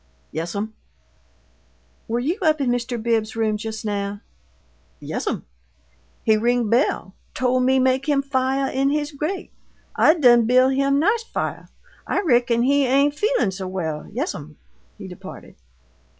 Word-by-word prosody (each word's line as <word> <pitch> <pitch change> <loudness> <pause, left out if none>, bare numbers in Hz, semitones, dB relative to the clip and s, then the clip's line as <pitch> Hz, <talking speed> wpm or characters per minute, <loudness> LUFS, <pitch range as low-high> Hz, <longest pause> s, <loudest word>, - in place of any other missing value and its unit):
"Yes'm?" 200 +7 -4 1.3
"Were 230 - -1
you 320 - -1
up 310 -3 +3
in 260 -3 +1
Mr. 245 0 -2
Bibbs's 220 -1 0
room 220 -1 +1
just 220 0 -6
now?" 200 -1 -3 0.8
"Yes'm. - - -4 0.8
He 220 -1 +4
ring 235 0 +1
bell; 230 -6 +1 0.2
tole 255 0 +1
me 260 +1 +3
make 260 +2 +1
him 280 -1 +2
fiah 270 0 0
in 270 +1 +1
his 295 +1 -1
grate. 315 +6 -4 0.4
I 315 - +5
done 240 -7 +5
buil' 255 +2 +5
him 275 +1 +2
nice 420 +10 +2
fiah. 455 - -4 0.4
I - - 0
reckon 240 - +2
he 280 +2 +3
ain' 280 +3 +3
feelin' 415 - +1
so 190 0 -6
well. 160 -5 -4
Yes'm." 275 - -5 0.4
He 200 -3 -9
departed. 180 -1 -11
250 Hz, 140 wpm, -22 LUFS, 220-280 Hz, 1.3 s, I